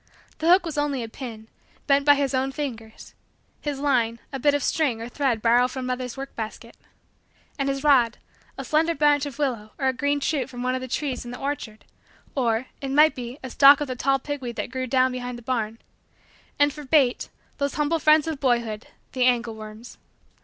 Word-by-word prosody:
His 320 - +1
hook 360 0 +6
was 310 -3 -3
only 285 -4 -1
a - - -5
pin, 225 -2 -9 0.4
bent 280 0 +3
by 290 -1 +7
his 275 -2 -1
own 265 +1 0
fingers; 230 -7 -7 0.5
his 290 -2 -3
line, 240 -5 +1
a 270 - -3
bit 290 +2 +3
of 290 - -1
string 280 -8 0
or 230 - -5
thread 245 -3 -1
borrowed 245 +2 +4
from 260 0 -5
mother's 250 0 -4
work 275 0 -7
basket; 220 -1 -7 0.8
and 275 0 0
his 275 0 -2
rod, 255 -6 +4 0.4
a 270 - -5
slender 320 +4 +2
branch 290 0 +3
of 280 - -9
willow 240 -7 -2
or 265 - 0
a - - 0
green 285 +3 0
shoot 285 -1 -1
from 245 -1 -6
one 255 0 0
of 255 - -2
the 255 - -5
trees 265 0 -3
in 240 - -8
the 245 - -7
orchard, 275 -6 -5 0.5
or, 235 -2 0 0.2
it 275 - -4
might 300 +3 +5
be, 245 0 -7
a 260 - -6
stalk 280 +2 +7
of 295 - -2
the 255 - -4
tall 270 +2 +2
pigweed 265 -3 -5
that - - -4
grew 255 0 -3
down 255 0 +3
behind 250 -1 -5
the 240 - -13
barn; 225 -3 -2 0.8
and 290 0 +3
for 300 - -9
bait, 270 -3 +2 0.3
those 280 0 -1
humble 300 +2 +1
friends 305 0 +5
of 315 -4 -3
boyhood, 235 -4 0 0.2
the 255 -1 +1
angle 240 -2 +2
worms. 215 +2 -11
260 Hz, 210 wpm, -24 LUFS, 240-285 Hz, 0.8 s, by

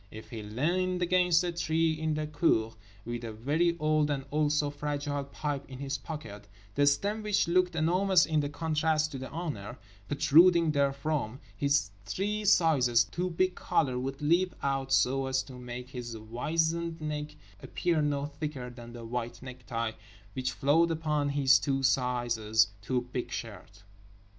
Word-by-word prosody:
If 110 +1 -11
he 115 -2 -5
leaned 175 - 0
against 180 -1 +3
a 175 - -1
tree 165 -1 +1
in 155 0 -1
the 155 0 -2
cour, 145 -7 +1 0.3
with 120 0 -4
a 115 - -4
very 155 +10 0
old 155 -1 +2
and 135 -2 -2
also 150 -1 +1
fragile 145 -1 -3
pipe 140 0 -4
in 130 - -8
his 135 0 -3
pocket—the 105 -4 -4
stem 200 +10 +1
(which 210 -4 +1
looked 180 0 +2
enormous 180 +3 +3
in 155 -2 +1
contrast 155 0 0
to 135 - -5
the 130 - -6
owner) 140 - -5 0.3
protruding 165 +3 +5
therefrom—his 140 -4 -1
three 205 - -2
sizes 140 -11 +4
too 180 +1 -3
big 185 +2 +1
collar 130 -5 0
would 135 +2 -4
leap 175 +4 +2
out 135 -1 -1
so 135 0 +2
as 130 0 0
to 135 - -12
make 125 0 -7
his 120 -3 -6
wizened 160 +9 -1
neck 150 -1 -4 0.3
appear 170 -3 0
no 145 -1 0
thicker 145 -4 -5
than 120 -1 -11
the 120 -1 -8
white 120 0 -4
necktie 125 -3 -4 0.4
which 130 +1 -2
flowed 145 +8 +3
upon 155 -3 0
his 135 -2 +5
two 135 +3 -1
sizes 120 -4 +2
too 125 +3 -2
big 125 -1 -3
shirt. 110 -4 -8
145 Hz, 155 wpm, -30 LUFS, 125-160 Hz, 0.4 s, protruding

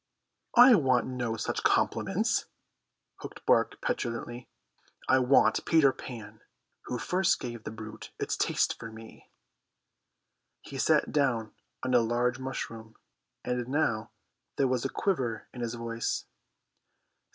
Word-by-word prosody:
"I 245 +1 +10
want 130 - +3
no 120 -3 -3
such - - -2
compliments," - - +1 0.7
Hook - - -10
barked - - +2
petulantly. 120 +1 -3 0.6
"I 130 - +5
want 130 +2 +4
Peter 150 -5 +4
Pan, 115 -4 -9 0.4
who 125 - -3
first 180 +8 +1
gave 120 -2 -6
the - - -3
brute 110 0 -9
its - - -1
taste - - 0
for 115 - -7
me." 110 0 -13 1.3
He - - -8
sat - - +3
down 125 -7 0 0.3
on 130 0 -1
a 125 - +7
large 120 +2 0
mushroom, 115 -4 -6 0.5
and 125 -1 -2
now 120 -6 0 0.5
there 135 - +2
was 125 -2 0
a 135 - -1
quiver 130 - -1
in 125 - -7
his 120 0 -3
voice. 115 -1 -3
120 Hz, 130 wpm, -29 LUFS, 115-130 Hz, 1.3 s, I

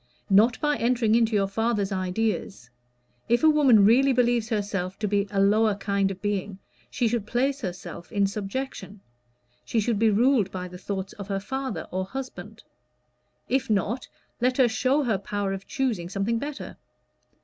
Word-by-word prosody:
"Not 220 +5 +5
by 295 -1 +1
entering 235 -2 +1
into 230 -1 +3
your 195 -1 +2
father's 210 -1 -1
ideas. 190 - -2 0.6
If 240 +5 +2
a 315 - +7
woman 260 -9 +5
really 265 +5 +5
believes 240 -2 +1
herself 195 -3 -2
to 215 - -2
be 200 0 +1
a 200 -1 -1
lower 210 +2 +3
kind 200 -1 0
of 190 0 -8
being, 200 -1 -2 0.3
she 245 - 0
should 225 -2 -2
place 270 +4 0
herself 175 -3 -7
in 200 -3 +2
subjection: 200 0 -5 0.6
she 230 - -1
should 215 -1 0
be 225 0 +4
ruled 225 -1 +3
by 185 -1 -5
the 180 0 -11
thoughts 190 +1 -5
of 200 -2 -9
her 195 -1 -2
father 265 +6 -4
or 185 +1 -1
husband. 215 -2 -8 0.8
If 260 -1 0
not, 215 +4 0 0.3
let 250 +1 +1
her 260 -3 +5
show 255 +6 +1
her 220 -7 0
power 200 0 -3
of 195 0 -7
choosing 220 -11 -2
something 200 +4 -1
better. 290 +2 -6
210 Hz, 170 wpm, -25 LUFS, 195-240 Hz, 0.8 s, a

